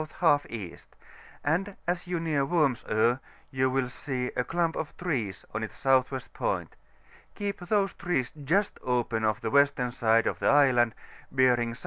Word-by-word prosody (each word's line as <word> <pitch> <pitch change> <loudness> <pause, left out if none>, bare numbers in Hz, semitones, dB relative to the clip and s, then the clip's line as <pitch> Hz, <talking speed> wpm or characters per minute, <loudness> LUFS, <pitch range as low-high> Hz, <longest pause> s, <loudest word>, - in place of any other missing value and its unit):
J 160 -5 +5
E.; 100 -7 -6 0.7
and 185 +7 0
as 180 +1 -1
you 175 -1 -1
near 155 -4 0
Worms 140 -5 +1
Oe, 115 +4 +3 0.3
you 130 0 +1
will 130 -1 0
see 125 0 -4
a 125 - +1
clump 165 +3 0
of 155 - -5
trees 125 - -3
on 105 - -2
its 110 - -5
S.W. 130 0 +2
point: - - -2 0.6
keep 200 -1 -3
these 195 +1 0
trees 175 -10 -1
just 160 +8 0
open 120 -3 0
of 110 -1 +1
the 110 - -2
western 140 -2 +3
side 115 -2 +3
of - - -1
the - - 0
island, 125 -5 +4 0.4
bearing 125 -3 +3
S.S. - - -12
135 Hz, 165 wpm, -28 LUFS, 120-165 Hz, 0.7 s, J